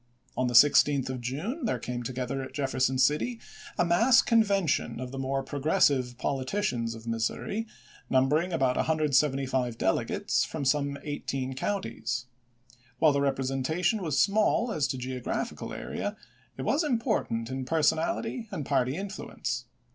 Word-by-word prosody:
On 130 - +1
the 120 - -2
16th 140 +1 +5
of 130 -1 -5
June 180 - -3
there 215 - 0
came 125 -1 -4
together 130 +2 -3
at 130 0 -8
Jeffer 135 -3 -2
son 130 0 +2
City 150 - +2 0.4
a 175 - +3
mass 230 +10 +5
convention 195 - +2
of 125 -1 -5
the 135 - -5
more 135 0 -1
progressive 140 -4 +1
politicians 130 - -1
of 115 0 -11
Missouri, 115 - -2 0.4
numbering 145 +7 +2
about 135 -6 +1
175 135 -5 +1
dele 95 -3 +1
gates, - - 0
from 150 -3 -4
some 140 +1 +1
eighteen 135 -3 -3
counties. 130 - -3 0.7
While 155 -2 +5
the 140 - +1
rep 140 -1 +1
resentation 135 - 0
was 155 -6 -1
small 215 +3 +3
as 150 -9 0
to 130 - -3
geographical 125 0 -4
area, 205 +1 -4 0.4
it - - -4
was 295 +5 +2
important 225 - -1
in 130 0 -3
personal 160 - +1 0.3
and 155 -8 -4
party 130 +1 +1
influence. 140 - -4
135 Hz, 145 wpm, -28 LUFS, 130-170 Hz, 0.7 s, 16th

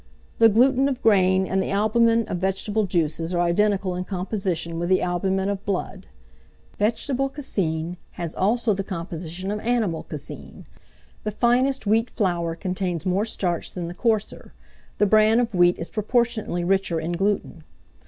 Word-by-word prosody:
The 225 0 +7
gluten 260 +5 +4
of 260 -2 -3
grain 190 -3 +4
and 190 0 0
the - - -3
albumen 230 +3 +2
of 180 - -3
vegetable 195 +3 -1
juices 165 -1 -1
are 175 - +2
identical 190 +2 +1
in 180 +1 -3
composition 180 -3 -3
with 175 +1 -2
the 185 - +4
albumen 190 +2 0
of 200 0 -3
blood. 195 -3 -4 0.7
Vegetable 245 +5 0
caseine 180 - -3 0.2
has 170 -2 -5
also 220 +3 +1
the 195 0 -3
composition 175 +1 -5
of 210 - -2
animal 220 -8 0
caseine. 150 -2 -8 0.6
The 215 - -1
finest 245 +4 +1
wheat 225 +3 +2
flour 170 -6 -1
contains 180 -1 -3
more 190 +3 +1
starch 180 -6 -1
than 175 -2 -4
the 170 - -6
coarser; 220 +2 -2 0.4
the 210 - +3
bran 215 +2 +5
of 235 -2 -1
wheat 175 -1 +4
is 170 - -5
proportionably 220 -4 0
richer 190 -2 +1
in 160 +2 -3
gluten. 185 -2 -1
195 Hz, 155 wpm, -24 LUFS, 175-220 Hz, 0.7 s, The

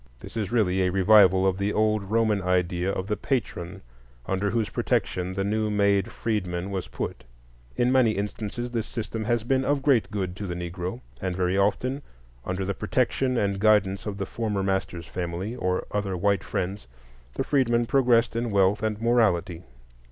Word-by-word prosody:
This - - -11
is 105 -2 -2
really 95 -6 +2
a 90 - +2
revival 95 -1 +5
of 95 0 +1
the 100 +1 0
old 110 -2 +1
Roman 110 -2 +2
idea 90 0 0
of 95 - -3
the 105 - -1
patron 95 - -3 0.4
under 95 +1 0
whose 110 0 0
protection 90 0 -1
the 95 - 0
new 110 +2 0
made 100 -2 +2
freedman 95 -4 -2
was 95 -2 -3
put. - - -5 0.5
In 125 +1 +2
many 125 -4 +4
instances 105 +4 -4
this 115 -2 -2
system 110 -1 -4
has 120 -1 +1
been 130 +2 +1
of 140 0 0
great 135 -6 +3
good 95 -4 -3
to 100 - -5
the 90 - -4
Negro, 90 +6 -5 0.2
and 95 -1 -2
very 90 0 0
often 105 +8 +1 0.5
under 95 +1 -2
the 100 - -1
protection 125 +4 0
and 100 -3 0
guidance 105 -2 +3
of 100 -1 -4
the 100 - -2
former 105 -3 -2
master's 95 -3 -2
family, 90 +6 -4
or 90 -6 -1
other 100 -3 -2
white 100 +1 +1
friends, 95 -3 -3 0.5
the - - 0
freedman 120 -4 +2
progressed 120 -3 +3
in 120 0 -1
wealth 100 0 +3
and 110 -1 -1
morality. 110 -8 +2
100 Hz, 175 wpm, -26 LUFS, 95-115 Hz, 0.5 s, revival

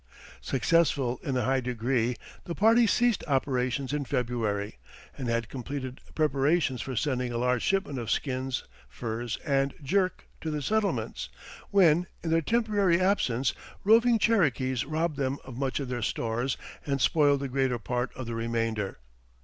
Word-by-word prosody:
Successful 135 -2 +2
in 135 -2 -1
a 125 - +1
high 130 +3 +2
degree, 125 0 0 0.3
the 170 - -4
party 225 +2 +5
ceased 240 +2 +2
operations 130 -1 0
in 150 -1 0
February, 115 - -2 0.4
and 130 - -4
had 115 -1 0
completed 130 +1 -6
preparations 145 -2 +2
for 130 - -4
sending 125 -1 0
a 120 - -2
large 125 0 +1
shipment 190 -9 0
of 115 -2 -5
skins, 130 -1 -1 0.3
furs, 115 - -4
and 140 -2 +1
"jerk" 185 +5 0 0.2
to 160 - -3
the 150 -2 -2
settlements, 215 +4 -1 0.4
when, 175 -3 +4 0.2
in 165 - -1
their 165 0 +4
temporary 205 -3 +2
absence, 135 - +1 0.3
roving 230 +3 +5
Cherokees 135 - +2
robbed 155 +1 -1
them 135 -1 -1
of 130 -2 -9
much 130 +1 -1
of 140 - -3
their 125 -1 -3
stores 120 +4 -1 0.3
and 140 -1 -1
spoiled 145 -1 +3
the 140 - -2
greater 130 -1 0
part 120 +2 -2
of 130 - -5
the 115 - -4
remainder. 115 -3 -2
135 Hz, 155 wpm, -28 LUFS, 125-160 Hz, 0.4 s, party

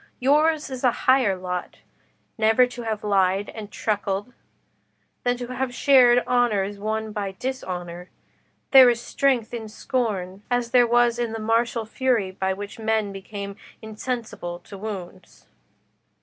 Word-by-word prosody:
Yours 300 +3 +2
is 260 0 -6
a 250 - +6 0.2
higher 255 -7 +4
lot, 180 -1 -5 0.6
never 225 +2 +4
to 245 0 -8
have 220 -2 -3
lied 195 -1 +1
and 210 -2 -8
truckled, 205 +1 -2 0.9
than 245 0 +1
to 245 0 -6
have 255 -1 -3
shared 245 -3 +5
honours 205 -5 +1
won 220 +1 -3
by 200 -2 -4
dishonour. 180 -9 -5 0.6
There 265 -2 +9
is 235 -1 +1
strength 245 -1 0
in 225 -2 -5
scorn, 205 -5 -3
as 245 -1 0
there 245 -1 +5
was 240 0 +3
in 235 -2 -2
the 225 - -4
martial 230 +1 0
fury 225 -4 0
by 190 0 -2
which 205 +4 -6
men 220 -2 0
became 200 +1 -7 0.2
insensible 220 -5 -5
to 200 - -12
wounds." 195 -3 -8
220 Hz, 140 wpm, -24 LUFS, 200-245 Hz, 0.9 s, There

